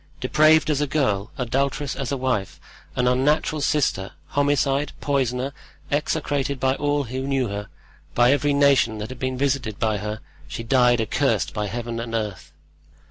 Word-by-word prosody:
Depraved 155 Hz, +4 st, +4 dB
as 145 Hz, -1 st, 0 dB
a 150 Hz, -, +1 dB
girl, 115 Hz, -8 st, 0 dB
adulterous 135 Hz, +3 st, -1 dB
as 135 Hz, -1 st, -4 dB
a 140 Hz, -, 0 dB
wife, 125 Hz, -7 st, -2 dB, 0.4 s
an 125 Hz, 0 st, +1 dB
unnatural 145 Hz, +4 st, +2 dB
sister, 130 Hz, -11 st, 0 dB, 0.2 s
homicide, 145 Hz, 0 st, +1 dB
poisoner, 135 Hz, -1 st, -1 dB, 0.4 s
execrated 145 Hz, -2 st, -1 dB
by 130 Hz, 0 st, +2 dB
all 145 Hz, +1 st, 0 dB
who 130 Hz, +2 st, -4 dB
knew 135 Hz, -4 st, 0 dB
her, 100 Hz, +1 st, -5 dB, 0.5 s
by 120 Hz, +1 st, +5 dB
every 145 Hz, +1 st, +2 dB
nation 140 Hz, -6 st, +3 dB
that 105 Hz, +1 st, -5 dB
had 130 Hz, -1 st, -8 dB
been 130 Hz, 0 st, -2 dB
visited 130 Hz, -6 st, -1 dB
by 110 Hz, -2 st, 0 dB
her, 105 Hz, +1 st, -4 dB, 0.3 s
she 115 Hz, -, -6 dB
died 125 Hz, 0 st, +4 dB
accursed 110 Hz, -, 0 dB
by 105 Hz, -1 st, -2 dB
Heaven 115 Hz, +2 st, -4 dB
and 115 Hz, 0 st, -4 dB
earth." 105 Hz, -4 st, -4 dB
130 Hz, 160 wpm, -23 LUFS, 115-140 Hz, 0.5 s, by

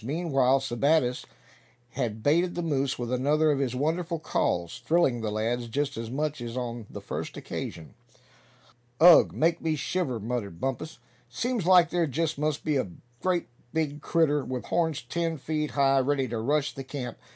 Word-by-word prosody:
Meanwhile 135 Hz, -2 st, +2 dB
Sebattis 135 Hz, 0 st, +1 dB, 0.7 s
had 115 Hz, -4 st, -3 dB
baited 170 Hz, +5 st, +2 dB
the 175 Hz, -, -2 dB
moose 140 Hz, -4 st, 0 dB
with 120 Hz, 0 st, -4 dB
another 150 Hz, +4 st, +3 dB
of 140 Hz, -, 0 dB
his 130 Hz, -3 st, -1 dB
wonderful 165 Hz, +5 st, -1 dB
calls, 90 Hz, -, -1 dB
thrilling 140 Hz, -6 st, +2 dB
the 110 Hz, -, -2 dB
lads 115 Hz, +3 st, -1 dB
just 140 Hz, +5 st, -2 dB
as 115 Hz, 0 st, -5 dB
much 145 Hz, +1 st, -2 dB
as 120 Hz, +1 st, -5 dB
on 120 Hz, -3 st, -4 dB
the -, -, -8 dB
first -, -, -5 dB
occasion. 80 Hz, -, -6 dB, 1.1 s
"Ugh! 175 Hz, 0 st, +8 dB
make 165 Hz, +2 st, +1 dB
me 160 Hz, -1 st, 0 dB
shiver," 140 Hz, -3 st, -2 dB
muttered 105 Hz, -6 st, -4 dB
Bumpus. 135 Hz, -, -3 dB, 0.3 s
"Seems 225 Hz, -, -2 dB
like 180 Hz, -2 st, +6 dB
there 175 Hz, -2 st, +1 dB
just 150 Hz, +2 st, -1 dB
must 150 Hz, 0 st, -1 dB
be 150 Hz, -2 st, +1 dB
a 120 Hz, -8 st, -1 dB, 0.3 s
great 180 Hz, -2 st, +1 dB, 0.3 s
big 150 Hz, -2 st, -1 dB
critter, 150 Hz, -4 st, +2 dB
with 130 Hz, -1 st, -4 dB
horns 160 Hz, -6 st, 0 dB
ten 165 Hz, +5 st, -2 dB
feet 150 Hz, +1 st, -2 dB
high, 135 Hz, -1 st, +3 dB
ready 135 Hz, 0 st, +1 dB
to 115 Hz, -1 st, -3 dB
rush 145 Hz, +5 st, 0 dB
the 135 Hz, -, -6 dB
camp. 130 Hz, -3 st, -6 dB
140 Hz, 170 wpm, -27 LUFS, 125-160 Hz, 1.1 s, Ugh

